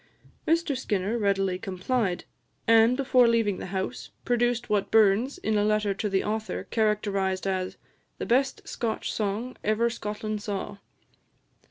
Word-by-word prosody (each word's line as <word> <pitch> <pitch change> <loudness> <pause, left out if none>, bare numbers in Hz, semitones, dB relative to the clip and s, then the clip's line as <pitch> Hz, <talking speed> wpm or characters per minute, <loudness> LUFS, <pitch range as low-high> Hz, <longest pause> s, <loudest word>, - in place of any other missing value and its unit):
Mr 330 -3 +2
Skinner 210 -4 -1
readily 195 -4 +1
complied, 195 0 -1 0.4
and, 230 +2 +6
before 255 -3 +4
leaving 225 -4 +2
the - - -6
house, 190 +5 -4 0.2
produced 240 0 +1
what 205 -2 0
Burns, 220 +4 +3
in 215 -1 0
a - - +2
letter 210 -1 +1
to 205 +2 -2
the 195 -1 +1
author, 220 +1 -3
characterised 200 -4 0
as 185 -1 -2 0.4
"the - - -4
best 265 +3 +1
Scotch 225 -2 -3
song 215 +4 -2
ever 220 +3 +2
Scotland 215 -1 -4
saw." 205 0 -4
215 Hz, 140 wpm, -27 LUFS, 195-235 Hz, 0.4 s, and